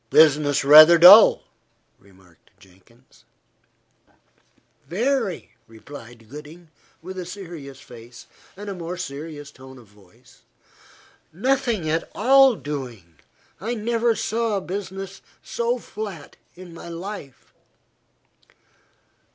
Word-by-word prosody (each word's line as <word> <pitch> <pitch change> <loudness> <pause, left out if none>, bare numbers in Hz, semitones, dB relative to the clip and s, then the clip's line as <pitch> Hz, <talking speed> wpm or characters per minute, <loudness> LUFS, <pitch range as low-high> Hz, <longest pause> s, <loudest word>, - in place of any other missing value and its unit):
"Business 145 -1 +3
rather 155 +4 +9
dull," 185 +6 +8 0.6
remarked 95 -3 -24
Jenkins. 95 +7 -24 1.6
"Very," 230 0 -2 0.2
replied 115 0 -14
Gooding, 150 +6 -13 0.3
with 185 +1 -8
a 180 - -6
serious 170 -8 -10
face, 120 0 -14 0.3
and 200 -1 -7
more 170 +2 -6
serious 150 -2 -8
tone 130 -1 -15
of 120 - -16
voice. 105 +4 -24 0.9
"Nothing 235 -2 -1
at 160 +2 -2
all 265 +2 +4
doing. 120 - -8 0.4
I 225 +7 -4
never 230 +1 -1
saw 225 -2 -2
business 195 0 -7 0.2
so 235 +1 -2
flat 205 -9 -9 0.2
in 180 -1 -13
my 170 +1 -11
life." 170 -5 -10
165 Hz, 95 wpm, -22 LUFS, 130-205 Hz, 1.6 s, rather